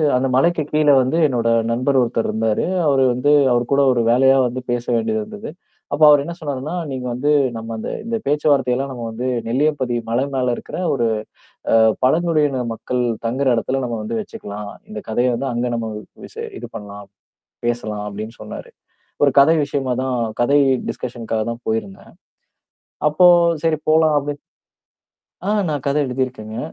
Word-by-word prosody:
அந்த 130 +1 +1
மலைக்குக் 155 +1 +1
கீழ 150 -1 +3
வந்து 130 +6 0
என்னோட 120 -4 0 0.2
நண்பர் 130 +4 +1
ஒருத்தர் 115 -1 0
இருந்தாரு. 110 -1 0 0.2
அவரு 135 -2 +3
வந்து 135 +4 +1 0.2
அவரு 120 0 +2
கூட 140 - +4
ஒரு 120 - +1
வேலையா 135 +2 +5
வந்து 125 +1 -5
பேச 120 0 -2
வேண்டியிருந்தது. 215 - -3 0.4
அப்போ 155 - +1
அவரு 145 -1 +6
என்ன 170 - -5
சொன்னாருன்னா, 145 +1 -4 0.2
"நீங்க 130 -1 -5
வந்து 145 +5 0 0.3
நம்ம 115 0 -6
இந்த - - -5 0.2
இந்த 230 0 -1
பேச்சுவார்த்தையெல்லாம் 140 -3 +1
நம்ம 120 -2 -7
வந்து 120 +3 -4 0.2
நெல்லியம்பதி 130 0 0
மலை 120 +4 +1
மேல 125 -2 +1
இருக்கிற - - -8 0.2
ஒரு 120 -4 +1 0.7
அ - - +6 0.3
பழங்குடியின 150 -2 +2
மக்கள் 125 +2 -3 0.2
தங்குற 130 +4 0
இடத்துல 130 +4 -1
நம்ம 120 -1 -3
வந்து 165 - -3
வச்சுக்கலாம். 105 - -8 0.2
இந்தக் 105 0 -8
கதைய 120 +3 +1
வந்து 135 +3 -3
அங்க 120 +1 -1
நம்ம 115 -1 -3
வ் 105 - -9 0.2
விசே 460 +1 -7
இது - - -7
பண்ணலாம், 100 -1 -9 0.6
பேசலாம்." 110 -3 -2
அப்படின்னு 110 +3 -7
சொன்னாரு. 105 - -9 0.5
ஒரு 140 - +5
கதை 155 +4 +6
விஷயமாதான், 130 -2 -2 0.2
கதை 140 +4 +4 0.3
டிஸ்கஷன்க்காகத்தான் 115 -1 -4
போயிருந்தேன். 210 -3 -4 1.0
அப்போ, 180 +4 +5 0.4
"சரி 160 -1 +2
போலாம்." 155 -1 +4
அப்டின் 145 +1 -5 1.1
ஆ 200 - 0 0.2
நான் 145 -4 -3
கதை 145 +2 +2
எழுதிருக்கேங்க. 125 -4 -4
130 Hz, 155 wpm, -20 LUFS, 120-145 Hz, 1.1 s, அவரு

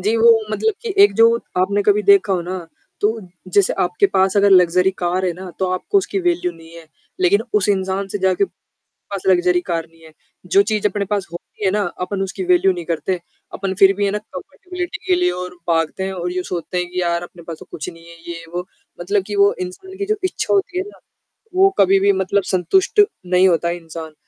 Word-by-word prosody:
जी, 215 +5 +1
वो 230 +1 +6 0.2
मतलब 440 - 0
कि 455 -4 -3
एक 410 - +6
जो 230 - +9 0.3
आपने 200 +3 +1
कभी 210 +1 +3
देखा 200 0 +4
हो 180 - +1
ना? 185 +2 -4 0.4
तो 205 - +3 0.4
जैसे 200 0 +3
आपके 180 +3 +2
पास 190 0 +1
अगर 200 0 +4
लग्ज़री 180 0 +5
कार 180 +1 -1
है 175 - 0
ना, 185 +2 -9
तो 190 - 0
आपको 185 - +1
उसकी 390 - -2
वैल्यू 355 0 0
नहीं 165 0 -15
है। 165 -1 -12 0.3
लेकिन 195 +4 +4
उस 210 -1 +2
इंसान 190 0 0
से 205 - -4
जाके 190 - +2 0.5
पास 200 -2 -9
लग्ज़री 180 -1 +3
कार 165 -1 -1
नहीं 165 0 -23
है। 160 - -15 0.3
जो 195 +3 +4
चीज़ 210 0 0
अपने 205 0 -3
पास 200 -1 -2
होती 175 +4 -9
है 190 - +3
ना, 210 +1 0 0.2
अपन 195 +2 -2
उसकी 195 - -4
वैल्यू 355 - +4
नहीं 175 -2 -6
करते। 175 +2 -2 0.3
अपन 190 -1 -3
फिर 195 0 +7
भी 205 - 0
है 200 - +1
ना 210 - -2
कम्पेटिबिलिटी 360 - -7
के 370 - +3
लिए 360 - +3
और 180 - -6
भागते 165 +3 0
हैं 190 - -3
और 180 -1 -4
यो 180 0 -2
सोचते 180 0 -4
हैं 180 0 -2
कि 180 - -2
यार 170 -1 0
अपने 175 0 -11
पास 165 -1 -7
तो - - -12
कुछ 155 - -6
नहीं 165 -2 -11
है, 170 - -13 0.2
ये-वो 170 +2 -7 0.3
मतलब 200 +3 0
कि 205 - -5
वो 200 0 +5
इंसान 280 - -7
की 400 - -2
जो 430 - 0
इच्छा 370 - -1
होती 385 -2 0
है 370 - -1
ना, - - -15 0.6
वो 385 +1 +6
कभी 195 0 +5
भी 200 +1 +4
मतलब 200 +1 +1
संतुष्ट 380 - +3 0.2
नहीं 180 +1 +4
होता 170 -1 +1
है 170 +1 -2
इंसान। 165 -1 -9
190 Hz, 225 wpm, -19 LUFS, 180-210 Hz, 0.6 s, जो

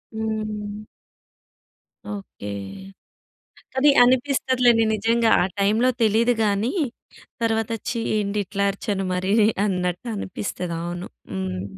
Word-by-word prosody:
హ్మ్. 215 -1 -4 1.3
ఓకే. 195 - -8 1.3
అది 290 +2 +6
అనిపిస్తదిలేండి 250 -2 +3
నిజంగా. 225 +2 +2
ఆ - - +3
టైమ్‌లో 220 +6 +3
తెలీదు 225 +2 +4
గాని 205 +4 +1 0.7
తర్వాత, 225 -1 +1 0.2
ఛీ 235 - -1 0.2
ఏంటి 210 0 -1
ఇట్లా 200 +1 -2
అరిచాను, 195 0 -3
మరీ 185 +2 0 0.3
అన్నట్టు 180 +3 -2
అనిపిస్తది. 180 -3 -4
అవును. 175 +2 -5 0.2
హ్మ్. 95 -1 -3
210 Hz, 95 wpm, -23 LUFS, 195-230 Hz, 1.3 s, అది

